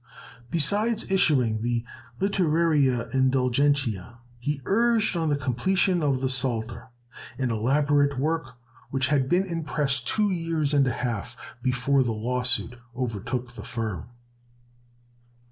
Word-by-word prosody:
Besides 205 - +1
issuing 130 - +2
the 120 0 -1 0.3
"Litterariæ 155 - +1
Indulgentiæ," 130 -4 +1 0.2
he 145 +4 -2
urged 230 -1 +2
on 165 -2 0
the 145 - +2
completion 175 - +1
of 140 -4 0
the 135 - +1
Psalter, 120 -2 0 0.5
an 130 -3 -1
elaborate 140 +4 +2
work 150 -2 -2 0.3
which 130 -1 0
had 135 -3 +1
been 180 +2 +2
in 170 -3 -4
press 145 -3 0
two 205 - 0
years 165 -4 -1
and 140 -2 +3
a - - +1
half, 115 -4 -4 0.2
before 130 +2 +1
the 120 -3 0
lawsuit 125 +2 0 0.2
overtook 125 0 -3
the - - -9
firm. 110 -8 -4
135 Hz, 125 wpm, -25 LUFS, 120-160 Hz, 0.5 s, and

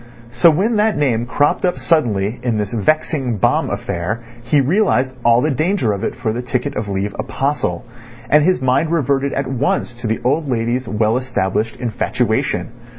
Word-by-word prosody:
So 120 +8 +5
when 200 +8 +1
that 215 0 +2
name 120 -5 +1
cropped 145 +3 +1
up 180 -1 +1
suddenly 115 - 0
in 120 -3 -1
this 105 0 -3
vexing 130 - 0
bomb - - +1
affair 95 +7 -3 0.2
he 145 +5 +2
realised 135 -4 +2
all 120 +1 +5
the 150 +3 +1
danger 155 - +1
of 100 - -5
it - - -2
for 120 -3 -2
the 120 - -3
ticket 125 +3 -2
of 105 0 -3
leave 100 +1 -2
apostle, 135 -9 -2 0.4
and 150 0 +4
his 180 -3 +2
mind 130 +5 +2
reverted 140 -4 +1
at 140 - -1
once 130 -1 -1
to 120 - -2
the 110 - -1
old 145 +3 0
lady's 120 +1 -1
well 110 +1 +1
established 110 -4 -1
infatuation. 125 +1 -1
125 Hz, 175 wpm, -18 LUFS, 115-145 Hz, 0.4 s, So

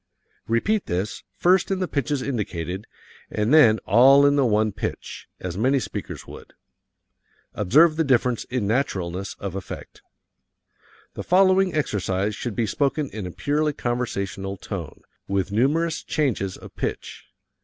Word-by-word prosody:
Repeat 195 - +1
this, 95 +4 -2
first 180 +1 +3
in 195 - 0
the 185 -1 -1
pitches 140 -2 -1
indicated, 95 - -4 0.4
and 105 +6 0
then 115 -9 +7
all 135 +6 +6
in 145 0 +4
the 140 -3 +3
one 110 0 +2
pitch, 100 - -6
as 90 +1 -5
many 135 +4 +3
speakers 100 -6 -6
would. - - -12 1.0
Observe 155 - +4
the 165 - +3
difference 125 -4 +1
in 125 -4 -2
naturalness 100 -6 -2
of 100 -3 -5
effect. 95 -1 -8 1.1
The - - -6
following 185 0 +4
exercise 100 - -1
should 120 -2 -5
be 115 - +1
spoken 140 +5 -1
in 105 -4 -5
a - - -6
purely 145 - 0
conversational 100 -6 -3
tone, 90 -5 -7 0.2
with 100 0 -1
numerous 155 - +1
changes 115 - -1
of - - -13
pitch. - - -5
120 Hz, 140 wpm, -24 LUFS, 100-145 Hz, 1.1 s, then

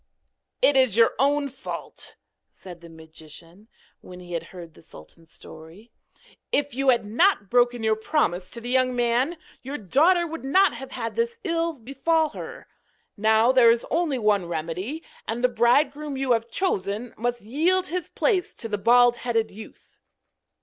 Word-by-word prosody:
'It 290 - +5
is 260 -6 +3
your 230 - +5
own 285 +1 +2
fault,' 270 0 -7 0.3
said 175 -2 -13
the 170 - -13
magician, 160 +4 -13 0.3
when 180 0 -12
he 175 -1 -10
had 170 - -3
heard 170 -3 -11
the - - -18
sultan's 160 - -16
story. 165 +9 -14 0.6
'If 285 -1 0
you 270 +2 +1
had 240 -4 +3
not 225 - +2
broken 245 -1 +2
your 220 0 +2
promise 205 - -1
to 235 - -8
the 240 +1 -5
young 255 -1 +2
man, 245 +7 +1 0.2
your 275 +3 -6
daughter 325 - +3
would 325 -2 -7
not 375 +9 +3
have 265 - -9
had 230 - -4
this 465 0 -2
ill 335 -2 -1
befall 295 +5 0
her. - - -9 0.5
Now 220 +3 +3
there 255 -3 +6
is 230 0 +2
only 320 -5 0
one 210 -5 +1
remedy, 175 - -4 0.2
and 230 +2 -3
the 250 - +4
bridegroom 275 +5 +1
you 265 -1 -1
have 230 0 +1
chosen 220 - -2
must 240 0 -3
yield 330 - +1
his 360 0 -4
place 385 -7 0
to 225 - -5
the 205 -2 -3
bald 240 +3 +5
headed 230 -3 -1
youth.' 215 +2 -14
240 Hz, 165 wpm, -24 LUFS, 205-285 Hz, 0.6 s, there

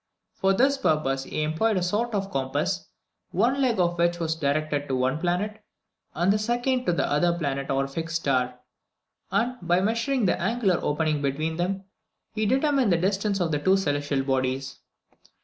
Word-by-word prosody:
For 195 -1 +2
this 270 +7 +3
purpose 135 - +1
he 155 - -2
employed 175 +8 +1
a 180 - 0
sort 210 +5 0
of 195 0 -2
compass, 145 +7 -1 0.4
one 265 +4 +1
leg 245 -6 +2
of 175 -1 +1
which 170 0 +2
was 160 -1 0
directed 145 -1 -1
to 130 - -1
one 130 +4 0
planet 205 +5 -2 0.5
and 175 +5 +3
the 210 - 0
second 245 +3 0
to - - +4
the 170 - +1
other 170 +4 +2
planet 140 -4 -2
or 135 0 +1
fixed 165 +4 -4
star; 125 -5 0 0.7
and, 250 +2 0
by 175 +1 +2
measuring 230 +5 0
the 180 - +1
angular 200 -2 +1
opening 150 0 0
between 155 +4 -1
them, 190 +2 -1 0.5
he 215 -1 0
determined 270 -2 +2
the 170 - +4
distance 195 +3 0
of 170 -3 0
the 150 - 0
two 190 +6 +3
celestial 145 -5 0
bodies. 135 0 -1
175 Hz, 175 wpm, -26 LUFS, 145-210 Hz, 0.7 s, to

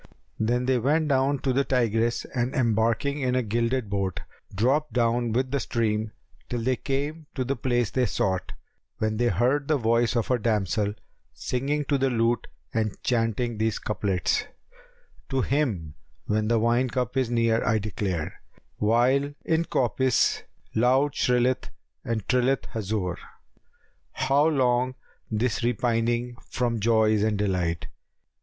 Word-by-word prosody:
Then 120 +3 +1
they 130 -1 +2
went 150 +5 +1
down 135 +1 +2
to 130 -2 +1
the 140 +2 +2
Tigris 120 -3 +1
and 125 +1 -1
embarking 115 +3 +1
in 125 -1 +1
a 130 - +2
gilded 115 +2 0
boat, 100 -2 -2 0.3
dropped 135 +10 +1
down 120 -1 +1
with 130 +3 0
the 140 - +1
stream, 110 -3 -1 0.4
till 120 -1 -2
they 130 +2 +2
came 145 +4 -3
to 130 - 0
the 135 +2 -1
place 120 -3 0
they 125 -2 +1
sought, 95 -2 -1 0.4
when 110 0 -1
they 120 +1 +2
heard 135 +4 +1
the 155 - +3
voice 115 0 +2
of 115 +1 0
a 125 - +2
damsel 105 -1 0 0.4
singing 140 +4 -1
to 140 0 +1
the 135 0 +2
lute 115 0 +1 0.3
and 110 -2 -1
chanting 115 -1 0
these 110 0 +1
couplets, 100 -4 -1 0.8
"To 135 -1 +1
him 115 - -1 0.3
when 110 0 0
the 115 +1 +3
wine 120 +3 +2
cup 125 0 -2
is 130 -3 +1
near 115 -1 +2
I 110 +1 +2
declare, 100 -5 -3 0.2
* - - -40
While 130 +6 +2
in 160 +1 +1
coppice 130 -1 +1 0.3
loud 130 +5 +3
shrilleth 125 +1 +1 0.3
and 110 -3 -3
trilleth 130 +1 +2
Hazбr, 100 -4 -2 1.0
'How 140 +3 +2
long 130 -4 +2 0.3
this 110 +1 -1
repining 120 0 0
from 120 -3 -1
joys 110 -1 +3
and 105 -1 +1
delight? 90 -4 -1
120 Hz, 145 wpm, -26 LUFS, 110-130 Hz, 1.0 s, the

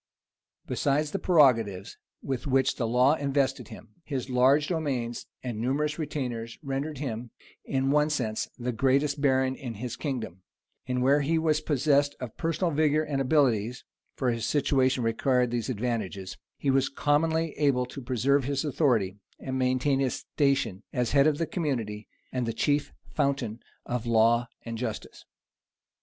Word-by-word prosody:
Besides 150 +2 0
the 195 - -2
prerogatives 115 - +3 0.3
with 135 +2 -3
which 135 0 +2
the 115 - -1
law 125 +5 +4
invested 140 -3 0
him, - - -12
his 135 -4 -4
large 135 +4 +4
demesnes 135 -9 -2 0.2
and 120 -4 -4
numerous 150 +6 -1
retainers 125 -7 -4
rendered 140 +2 -3
him, 120 -4 -4 0.4
in 135 0 0
one 150 +1 +3
sense, 115 -8 -2
the 125 0 -2
greatest 140 +4 +1
baron 130 -2 +2
in 125 -5 -7
his 120 +3 -5
kingdom; 120 - -4 0.5
and 125 0 0
where 140 +3 +4
he 160 +4 +1
was 155 -1 +1
possessed 145 -1 +2
of 125 -4 -7
personal 165 +1 -1
vigor 155 0 +2
and 140 -3 -2
abilities, 125 -5 +1 0.3
(for 130 -3 0
his 115 -1 -3
situation 130 -3 +2
required 125 +2 +1
these 120 -1 -2
advantages,) 105 -5 -3 0.2
he 140 - +1
was 135 0 +2
commonly 160 +3 +1
able 135 -4 +2
to 125 +2 -9
preserve 130 +2 +1
his 140 +1 -1
authority, 120 - +1 0.2
and 130 -1 -3
maintain 130 +2 +1
his 130 -3 0
station 135 -9 0
as 125 -2 -1
head 140 +1 +5
of 150 -2 +2
the 165 - 0
community, 115 - -3 0.2
and 125 -2 -2
the 115 - -1
chief 145 +5 0 0.2
fountain 130 -5 -1 0.3
of 120 -1 -3
law 115 +1 +4 0.2
and 115 -1 -5
justice. 115 -4 -5
130 Hz, 155 wpm, -27 LUFS, 120-145 Hz, 0.5 s, head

